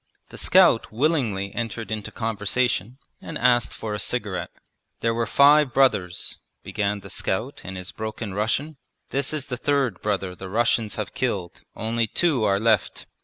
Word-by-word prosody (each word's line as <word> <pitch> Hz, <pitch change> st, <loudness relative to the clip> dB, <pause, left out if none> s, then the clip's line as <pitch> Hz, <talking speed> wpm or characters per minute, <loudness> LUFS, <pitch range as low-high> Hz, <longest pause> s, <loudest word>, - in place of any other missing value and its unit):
The -, -, -11 dB
scout -, -, +4 dB
willingly 115 Hz, -7 st, 0 dB
entered 115 Hz, -2 st, -4 dB
into 105 Hz, -2 st, -4 dB
conversation 115 Hz, +1 st, -1 dB, 0.2 s
and -, -, -5 dB
asked 120 Hz, -3 st, +3 dB
for 110 Hz, -2 st, -5 dB
a 105 Hz, -, -3 dB
cigarette. 105 Hz, -5 st, -1 dB, 0.5 s
'There 115 Hz, 0 st, +1 dB
were 115 Hz, 0 st, -1 dB
five 145 Hz, -1 st, +5 dB
brothers,' 95 Hz, -10 st, +1 dB, 0.2 s
began 100 Hz, -1 st, -2 dB
the 100 Hz, -, -10 dB
scout 120 Hz, +10 st, -2 dB
in 95 Hz, -, -7 dB
his 90 Hz, 0 st, -6 dB
broken 110 Hz, -2 st, -5 dB
Russian. 130 Hz, +9 st, -1 dB, 0.3 s
'This 140 Hz, 0 st, 0 dB
is 150 Hz, -3 st, -3 dB
the 125 Hz, -2 st, -4 dB
third 135 Hz, -7 st, 0 dB
brother 95 Hz, -3 st, -1 dB
the 95 Hz, +1 st, -9 dB
Russians 115 Hz, 0 st, +1 dB
have 105 Hz, -3 st, -4 dB
killed, 100 Hz, -9 st, -2 dB
only 115 Hz, +1 st, 0 dB
two 145 Hz, -1 st, +1 dB
are 100 Hz, -2 st, +3 dB
left. 110 Hz, -3 st, +1 dB
110 Hz, 160 wpm, -24 LUFS, 100-125 Hz, 0.5 s, five